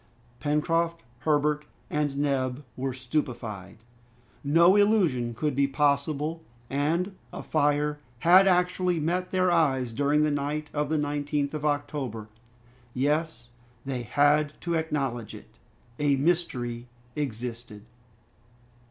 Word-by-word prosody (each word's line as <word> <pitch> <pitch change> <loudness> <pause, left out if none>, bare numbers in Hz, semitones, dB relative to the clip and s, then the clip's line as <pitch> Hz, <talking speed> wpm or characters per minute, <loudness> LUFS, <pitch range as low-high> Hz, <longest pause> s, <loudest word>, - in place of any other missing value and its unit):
Pencroft, 165 +4 0 0.2
Herbert, 150 +2 +1 0.2
and 145 -2 -1
Neb 135 -1 -1
were 135 +1 -2
stupefied. 120 -7 -4 0.7
No 170 +6 +5
illusion 175 - +2
could 150 +3 -1
be 140 0 +3
possible, 145 +3 0 0.3
and 165 +8 0 0.2
a - - -7
fire 150 -1 +1 0.2
had 185 +3 +7
actually 180 -1 +2
met 180 +4 -1
their 185 -1 +2
eyes 135 -8 +2
during 145 +4 +2
the 150 - +2
night 145 +1 -2
of 150 -1 -1
the 160 - +1
19th 145 0 -1
of 150 -1 -4
October. 140 -7 -2 0.7
Yes! 145 -3 -1 0.4
they 130 -2 -3
had 145 +4 +2
to 170 - -2
acknowledge 140 -8 -2
it, - - -14 0.5
a 145 -1 +3
mystery 130 -6 -1 0.3
existed! 115 -5 -5
145 Hz, 115 wpm, -27 LUFS, 130-160 Hz, 0.7 s, had